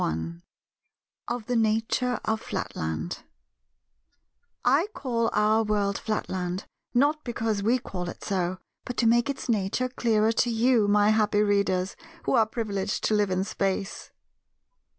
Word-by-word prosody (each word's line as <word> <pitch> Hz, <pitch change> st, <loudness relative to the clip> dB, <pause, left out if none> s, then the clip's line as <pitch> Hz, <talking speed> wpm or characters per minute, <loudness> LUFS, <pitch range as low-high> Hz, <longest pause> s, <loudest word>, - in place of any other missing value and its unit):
§ -, -, +2 dB
1 80 Hz, +1 st, -3 dB, 0.9 s
Of 240 Hz, -2 st, -3 dB
the 245 Hz, -, -1 dB
Nature 225 Hz, +3 st, +1 dB
of 220 Hz, 0 st, 0 dB
Flatland 80 Hz, -, -4 dB, 1.5 s
I 280 Hz, +9 st, +4 dB
call 235 Hz, -4 st, 0 dB
our 215 Hz, +1 st, +3 dB
world 205 Hz, -2 st, 0 dB
Flatland, 185 Hz, -3 st, -3 dB, 0.3 s
not 290 Hz, +4 st, +3 dB
because 225 Hz, -4 st, -1 dB
we 230 Hz, +5 st, +3 dB
call 180 Hz, -8 st, -5 dB
it -, -, -9 dB
so, 185 Hz, -2 st, -1 dB, 0.3 s
but 245 Hz, -, -6 dB
to 235 Hz, -, +2 dB
make 235 Hz, +4 st, +4 dB
its 280 Hz, -, -4 dB
nature 225 Hz, +3 st, 0 dB
clearer 225 Hz, -3 st, +2 dB
to 240 Hz, +2 st, +1 dB
you, 230 Hz, -1 st, +3 dB
my 205 Hz, 0 st, +4 dB
happy 210 Hz, -1 st, +3 dB
readers, 200 Hz, -2 st, +1 dB, 0.3 s
who -, -, 0 dB
are 220 Hz, -2 st, +4 dB
privileged 205 Hz, -3 st, -2 dB
to -, -, +2 dB
live 210 Hz, -2 st, +2 dB
in 185 Hz, 0 st, 0 dB
Space. 195 Hz, 0 st, -2 dB
215 Hz, 145 wpm, -27 LUFS, 195-235 Hz, 1.5 s, I